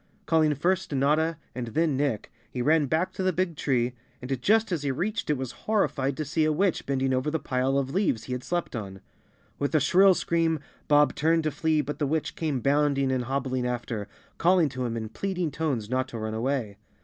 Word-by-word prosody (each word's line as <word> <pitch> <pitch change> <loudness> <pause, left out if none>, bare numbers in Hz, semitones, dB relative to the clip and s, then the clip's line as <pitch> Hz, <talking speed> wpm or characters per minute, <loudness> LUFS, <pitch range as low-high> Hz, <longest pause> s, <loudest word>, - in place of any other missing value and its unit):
Calling 155 -2 +3
first 180 +5 0
Notta 155 +4 +2 0.2
and 125 -2 -4
then 155 +5 +1
Nick, 135 -6 -1 0.2
he 125 - -6
ran 150 +1 +3
back 160 +6 0
to - - -4
the 185 0 +2
big 180 -1 -1
tree, 125 -4 0 0.3
and 125 0 -4
just 220 - +3
as 170 -5 0
he 145 - -1
reached 180 - -2
it 150 - +2
was 130 -2 -4 0.2
horrified 140 -11 +1
to 155 - -2
see 155 +3 0
a 155 - +3
witch 180 +3 0
bending 135 -1 +1
over 130 +3 0
the 160 - 0
pile 130 -1 0
of 135 -1 -1
leaves 170 - +1
he 125 - -8
had 125 0 -4
slept 175 -6 -2
on. 95 -4 -6 0.6
With 145 +2 -1
a - - +6
shrill 185 +6 +5
scream 165 -2 +1 0.3
Bob 145 -2 +5
turned 165 +2 +2
to 155 - 0
flee 155 +1 +1
but 145 +1 -5
the 145 - +1
witch 155 +2 -1
came 150 -6 -1
bounding 140 -1 +2
and 130 -2 0
hobbling 130 -1 -1
after, 120 -4 -3 0.3
calling 175 -2 +4
to 130 -1 -4
him 115 0 -3
in 110 -1 -4
pleading 180 - -2
tones 140 -8 -2
not 130 +2 0
to 120 - -7
run 110 0 -3
away. 115 -3 -2
145 Hz, 215 wpm, -27 LUFS, 130-160 Hz, 0.6 s, a